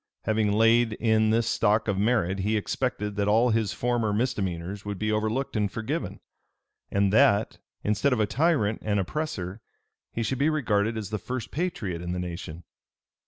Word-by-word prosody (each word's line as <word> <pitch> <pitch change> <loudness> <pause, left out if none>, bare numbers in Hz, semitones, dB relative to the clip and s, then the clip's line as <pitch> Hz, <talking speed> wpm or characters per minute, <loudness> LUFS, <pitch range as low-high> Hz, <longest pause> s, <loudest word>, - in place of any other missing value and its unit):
Having 110 -2 +1
laid 115 +1 +4
in 110 0 +2
this 115 +1 +2
stock 110 -1 +2
of 105 - +1
merit, 100 -3 +1
he 105 +3 +1
expected 105 -2 -2
that 100 0 +1
all 115 +4 +4
his 110 -2 +1
former 120 -3 0
misdemeanors 100 -5 -2
would 105 -1 -4
be 110 +2 -1
overlooked 110 +6 -1
and 105 -2 0
forgiven; 110 - -4 0.7
and 100 0 +1
that, 105 0 +3 0.2
instead 105 +7 +1
of 125 - +1
a 105 - +3
tyrant 135 -4 +1
and 105 -1 +1
oppressor, 100 - -3 0.5
he 115 - -2
should 130 +3 -2
be 145 +3 +3
regarded 110 -7 0
as 105 -1 -5
the 110 - -2
first 125 +1 -5
patriot 110 - -3
in 90 0 -4
the 90 - -3
nation. 85 -2 -6
110 Hz, 170 wpm, -26 LUFS, 100-115 Hz, 0.7 s, laid